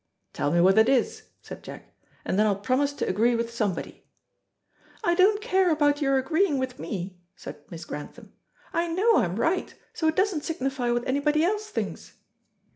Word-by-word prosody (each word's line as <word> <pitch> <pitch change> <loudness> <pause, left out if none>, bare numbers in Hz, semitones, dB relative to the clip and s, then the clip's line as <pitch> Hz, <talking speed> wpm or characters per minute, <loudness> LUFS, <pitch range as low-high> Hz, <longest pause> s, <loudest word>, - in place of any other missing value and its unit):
"Tell - - -1
me 170 - +2
what 190 +4 +5
it 220 +3 +5
is," 265 -3 0
said - - -9
Jack, - - -11 0.3
"and 190 - 0
then 215 - +4
I'll 205 - +2
promise 260 +8 0
to - - -3
agree 230 +5 +2
with 230 0 -3
somebody." 205 -7 -3 1.0
"I 345 - +3
don't 395 +4 +4
care 380 -5 +2
about 295 -2 +2
your 275 -1 +2
agreeing 315 +4 +1
with 260 -1 -4
me," 185 -2 -5 0.2
said 150 - -10
Miss 165 -1 -8
Grantham. 145 - -9 0.4
"I 340 +1 0
know 395 +7 +3
I'm 175 0 +1
right, 330 - -1 0.2
so 320 - -1
it 315 - +1
doesn't 380 -6 +1
signify 270 -5 -2
what 240 0 -1
anybody 295 +3 +1
else 420 +4 -1
thinks." - - -5
270 Hz, 180 wpm, -26 LUFS, 220-335 Hz, 1.0 s, what